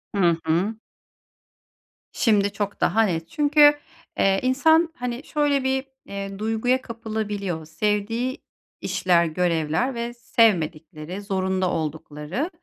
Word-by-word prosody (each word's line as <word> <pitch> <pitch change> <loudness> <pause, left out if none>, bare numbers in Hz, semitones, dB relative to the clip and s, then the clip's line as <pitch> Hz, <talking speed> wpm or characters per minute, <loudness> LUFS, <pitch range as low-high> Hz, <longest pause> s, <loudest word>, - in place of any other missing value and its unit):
Hı 175 -4 +3
hı. 180 +8 +1 1.4
Şimdi 205 -3 +2
çok 205 -1 -4
daha 225 - +3
net. 165 -5 -2
Çünkü, 295 0 +5 0.4
eee, 195 0 +3
insan 320 +6 +3
hani 245 +2 -4
şöyle 290 -3 0
bir, 265 +1 0 0.2
eee, 195 0 -6
duyguya 225 +4 0
kapılabiliyor. 210 -7 -4
Sevdiği 210 +9 -2 0.4
işler, 180 -2 +2
görevler 165 - 0
ve 235 +1 -4
sevmedikleri, 175 -6 0
zorunda 190 -2 -1
oldukları. 155 - -4
205 Hz, 105 wpm, -23 LUFS, 175-245 Hz, 1.4 s, Çünkü